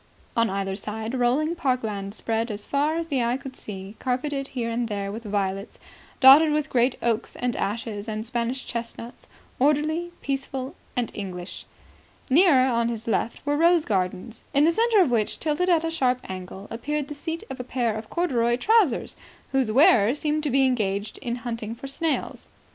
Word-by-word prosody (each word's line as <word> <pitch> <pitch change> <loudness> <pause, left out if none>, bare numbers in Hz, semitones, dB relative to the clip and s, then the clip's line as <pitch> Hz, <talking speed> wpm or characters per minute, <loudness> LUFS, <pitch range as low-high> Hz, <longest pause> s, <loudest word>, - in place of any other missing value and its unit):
On 230 -1 +3
either 195 0 -2
side 220 +3 -4
rolling 260 +6 +1
park 255 -7 0
land 200 -2 -4
spread 225 +1 -1
as 210 -1 -4
far 290 +3 +1
as 335 0 -3
the 265 -4 +1
eye 240 +2 +1
could 270 -1 -9
see, 195 0 -8
carpeted 275 +2 -2
here 235 -4 -3
and 235 0 -1
there 200 -2 -3
with 220 +3 -6
violets, 200 -2 -3 0.4
dotted 285 +4 +8
with 305 0 -1
great 245 +1 +2
oaks 235 -1 -1
and 245 -1 -2
ashes 210 0 -3
and 215 0 -3
Spanish 240 +2 -2
chestnuts, 235 0 -6 0.3
orderly, 305 +5 +1
peaceful 270 0 -3 0.2
and 245 -3 -1
English. 185 -3 -7 0.6
Nearer, 290 -4 +6
on 235 -2 +1
his 230 -1 -5
left, 230 +3 -1
were 290 0 +1
rose 335 +1 +4
gardens, 190 +3 -2
in 285 - +5
the 330 - +5
centre 450 +2 +4
of 315 -9 +2
which, 220 -3 0
tilted 320 +4 0
at 335 -2 +4
a 325 - -1
sharp 255 -6 +2
angle, 190 +2 -7
appeared 290 +5 -2
the 295 - -6
seat 325 +3 -5
of 265 - -6
a - - -3
pair 240 -3 -1
of 215 0 -7
corduroy 240 -9 +1
trousers, 410 - +2 0.4
whose 265 -5 +1
wearer 240 -2 +5
seemed 300 +1 0
to 300 - -1
be 270 +1 +4
engaged 210 -5 -1
in 240 -3 -3
hunting 230 -2 -4
for 255 - -10
snails. 305 +4 -2
245 Hz, 180 wpm, -25 LUFS, 220-290 Hz, 0.6 s, dotted